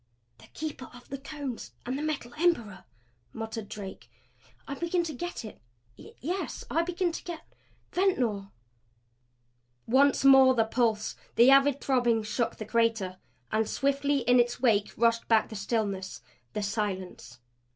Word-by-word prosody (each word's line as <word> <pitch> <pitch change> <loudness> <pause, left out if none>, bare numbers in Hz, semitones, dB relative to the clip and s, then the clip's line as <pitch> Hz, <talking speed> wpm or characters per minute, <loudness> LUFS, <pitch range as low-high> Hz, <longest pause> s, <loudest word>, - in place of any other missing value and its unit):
"The - - -16
Keeper 300 -4 -6
of 245 - -15
the 275 - -5
Cones 280 -3 -6
and 250 +2 -2
the 285 - -3
Metal 295 -6 -3
Emperor!" 235 - +1 0.5
muttered 225 -1 -6
Drake. 195 -2 -8 0.6
"I - - -4
begin 340 +4 0
to 320 -2 -4
get 350 -3 -5
it 215 - -11 0.3
yes 355 - -5
I 330 - +3
begin 350 +1 -1
to - - -7
get 340 -3 -7 0.5
Ventnor!" 245 - +1 1.4
Once 275 +3 +3
more 265 -1 +8
the 225 -2 +3
pulse, 225 -2 0 0.2
the 240 +3 +7
avid 275 0 +5
throbbing 240 -4 +2
shook 210 +2 -1
the 215 - -7
crater. 220 -5 0 0.3
And 220 +1 +2
as - - -5
swiftly 280 0 +1
in 245 +1 +4
its 240 0 +1
wake 220 -5 +2
rushed 230 0 +2
back 225 -1 +3
the 220 - -8
stillness, 200 - -2 0.3
the 210 - -2
silence. 190 - -4
240 Hz, 150 wpm, -28 LUFS, 215-280 Hz, 1.4 s, more